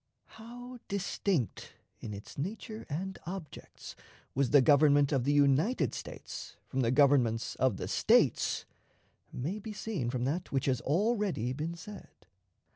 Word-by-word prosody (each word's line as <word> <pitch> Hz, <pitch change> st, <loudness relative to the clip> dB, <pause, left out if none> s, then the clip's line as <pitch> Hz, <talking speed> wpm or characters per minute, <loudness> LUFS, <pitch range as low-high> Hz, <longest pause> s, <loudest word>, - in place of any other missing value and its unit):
How 245 Hz, +2 st, -9 dB
distinct 195 Hz, -, -2 dB, 0.3 s
in 105 Hz, -, -6 dB
its 100 Hz, 0 st, -9 dB
nature 215 Hz, -, -5 dB
and 190 Hz, +6 st, -4 dB
objects 180 Hz, -4 st, -8 dB, 0.4 s
was 135 Hz, -1 st, +1 dB
the 145 Hz, -, +7 dB
Government 145 Hz, +1 st, +5 dB
of 135 Hz, -4 st, +1 dB
the 145 Hz, -, +3 dB
United 145 Hz, -, +3 dB
States -, -, -8 dB
from 135 Hz, -, -4 dB
the 120 Hz, -3 st, +2 dB
governments 130 Hz, -4 st, +3 dB
of 130 Hz, -6 st, +2 dB
the -, -, -4 dB
States, -, -, +3 dB, 0.7 s
may 165 Hz, +12 st, -3 dB
be 215 Hz, +1 st, -7 dB
seen 200 Hz, -, -3 dB
from 125 Hz, -1 st, -2 dB
that 160 Hz, +8 st, -2 dB
which 135 Hz, -1 st, 0 dB
has 130 Hz, -3 st, +1 dB
already 190 Hz, -, 0 dB
been 155 Hz, +5 st, -4 dB
said. 200 Hz, +4 st, -12 dB
145 Hz, 140 wpm, -31 LUFS, 130-195 Hz, 0.7 s, the